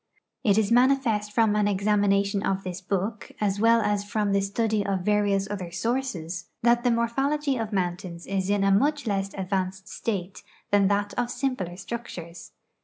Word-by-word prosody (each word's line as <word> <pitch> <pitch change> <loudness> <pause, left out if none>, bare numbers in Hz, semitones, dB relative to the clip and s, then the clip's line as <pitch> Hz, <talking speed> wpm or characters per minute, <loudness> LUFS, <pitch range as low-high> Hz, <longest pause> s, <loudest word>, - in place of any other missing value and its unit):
It 205 -2 +3
is 220 0 +2
manifest 240 -4 +3
from 220 -1 +3
an 210 -1 +2
examination 200 0 +2
of 195 0 -1
this 185 0 -5
book, 200 +4 -3
as 200 -1 0
well 230 +1 +5
as 205 -1 0
from 210 -1 -1
the 200 0 +3
study 210 +1 0
of 195 -2 -1
various 200 0 +1
other 190 -4 -5
sources, 185 -7 -3
that 240 0 +4
the 250 - +3
morphology 270 +5 +1
of 225 -3 -3
mountains 175 -2 -3
is 195 -1 -2
in 205 -1 +2
a 195 - +3
much 285 +8 +2
less 195 -2 -1
advanced 190 0 -2
state 195 -5 -4 0.3
than 200 -1 +4
that 205 +1 0
of 245 0 0
simpler 245 -10 -2
structures. 180 -6 -7
205 Hz, 170 wpm, -26 LUFS, 195-230 Hz, 0.3 s, well